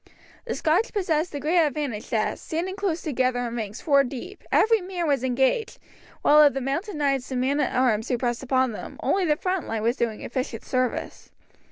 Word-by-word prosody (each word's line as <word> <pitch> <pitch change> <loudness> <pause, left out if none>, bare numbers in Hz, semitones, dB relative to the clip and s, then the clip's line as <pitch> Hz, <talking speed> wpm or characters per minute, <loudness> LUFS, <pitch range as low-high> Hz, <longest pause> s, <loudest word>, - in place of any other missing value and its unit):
The 470 - -2
Scotch 345 +9 +1
possessed 350 -5 0
the 290 - -4
great 325 +5 +2
advantage 285 -7 -3
that, 215 -2 0
standing 350 +4 -3
close 385 -5 -2
together 255 -4 0
in 235 - -5
ranks 215 -2 -5
four 280 -3 +4
deep, 275 +10 -7
every 450 -1 +4
man 360 -2 -3
was 275 -4 +1
engaged, 265 - +1 0.5
while 300 +1 +7
of 290 -3 +5
the - - 0
mounted 290 - -3
knights 275 -3 0
and 260 -2 -2
men 275 +3 +1
at - - 0
arms 240 -3 +2
who 250 - +1
pressed 240 0 -1
upon 260 -1 +1
them, 215 - -8
only 385 -2 +2
the 300 -3 +3
front 365 +2 -2
line 225 -1 -2
was 235 +3 +1
doing 225 -2 -2
efficient 255 -2 -4
service. 255 -1 -2
275 Hz, 200 wpm, -25 LUFS, 250-340 Hz, 0.5 s, while